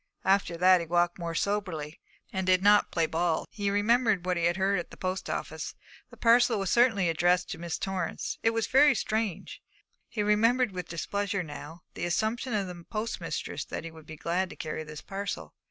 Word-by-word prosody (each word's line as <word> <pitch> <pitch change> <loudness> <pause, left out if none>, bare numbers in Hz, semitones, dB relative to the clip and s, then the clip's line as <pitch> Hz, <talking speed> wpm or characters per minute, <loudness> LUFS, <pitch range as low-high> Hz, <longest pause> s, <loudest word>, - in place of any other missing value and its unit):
After 190 -3 +2
that 185 +1 +6
he 165 - -6
walked 175 +1 +1
more 170 -1 -4
soberly, 165 -6 -2 0.3
and 190 -1 -2
did 185 0 +4
not 205 0 +5
play 165 -2 +2
ball. 165 0 0
He 205 -1 -2
remembered 210 -1 +2
what 180 0 +1
he 170 -1 0
had 175 +2 +2
heard 195 0 +2
at 175 - -6
the - - -13
post 185 0 -3
office. - - -4 0.3
The - - -15
parcel 235 0 +4
was 195 -3 -1
certainly 230 -7 +4
addressed 175 +2 +2
to 180 - -5
Miss 170 -1 -3
Torrance. 185 -3 -3
It 225 - +4
was 225 -1 0
very 280 +1 +5
strange. 215 -5 -2 0.5
He 210 - -2
remembered 230 +3 +3
with 180 -1 -6
displeasure 200 +4 -2
now 155 +2 -9
the - - -3
assumption 220 +7 -1
of 200 -2 0
the 175 -2 -8
postmistress 220 +1 -3
that - - -5
he 165 - -7
would 160 -1 -14
be 160 - -9
glad 175 +4 -1
to - - -10
carry 155 0 -4
this 150 -1 -9
parcel. 200 +1 -5
190 Hz, 200 wpm, -29 LUFS, 170-210 Hz, 0.5 s, that